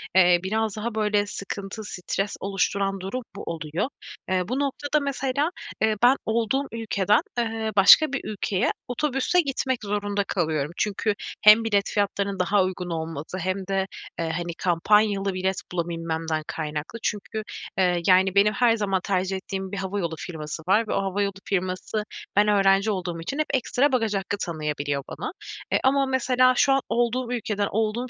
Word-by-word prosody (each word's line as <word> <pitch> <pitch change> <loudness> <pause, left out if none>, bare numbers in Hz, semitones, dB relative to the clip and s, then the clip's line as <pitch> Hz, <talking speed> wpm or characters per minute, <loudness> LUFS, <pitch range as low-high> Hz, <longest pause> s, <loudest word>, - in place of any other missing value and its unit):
eee, 180 -2 +6
biraz 215 +2 -1
daha 220 +1 -4
böyle 210 -1 +2
sıkıntı, 200 +1 -6
stres 195 0 -3
oluşturan 195 0 0
durum 195 +7 -4
bu - - -7
oluyor. 165 - -3 0.4
Eee, 185 0 +2
bu 255 +5 -1
noktada 285 +2 0
mesela, 280 +1 -1 0.3
ııı, 220 -1 +3
ben 250 +2 +7
olduğum 235 +5 +1
ülkeden, 210 -3 +1 0.2
ııı, 225 -1 -1
başka 260 +9 +7
bir 275 - -1
ülkeye 210 0 -1 0.2
otobüsle 270 +6 +1
gitmek 265 -4 -1
zorunda 205 0 -1
kalıyorum. 160 -6 -1
Çünkü 210 +1 0 0.3
hem 215 +1 +8
bilet 205 -3 +1
fiyatlarının 200 -1 -1
daha 195 +2 +3
uygun 185 -1 -3
olması 160 0 -4
hem 185 +1 -2
de, 195 -1 0 0.3
eee, 165 -1 -1
hani 170 +1 -3
kampanyalı 195 +3 +3
bilet 190 +1 -1
bulabilmemden 165 -2 -2
kaynaklı. 155 +7 -4
Çünkü, 215 +1 -3 0.3
eee, 180 -2 +2
yani 190 0 +5
benim 205 +2 +5
her 235 0 +3
zaman 195 -3 0
tercih 190 0 0
ettiğim 190 0 -5
bir 200 - -4
havayolu 190 -4 -2
firması 160 -1 -6
var 215 +4 +3
ve - - -1
o - - +1
havayolu 200 +1 -1
firması 185 +2 -2 0.3
ben 205 +1 +5
öğrenci 200 0 +4
olduğum 175 -4 -3
için 275 - -4
hep 310 - +2
ekstra 265 +2 +2
bagaj 225 -5 +1
hakkı 195 +1 -2
tanıyabiliyor 150 -5 -3
bana. - - -5 0.4
E, - - +5
ama 275 +1 +3
mesela 255 -1 +3
şu 270 +2 +4
an 270 - +2
olduğum 240 +2 0
ülkeden, 210 -4 -1
olduğum 225 +4 -1
200 Hz, 160 wpm, -25 LUFS, 185-225 Hz, 0.4 s, hem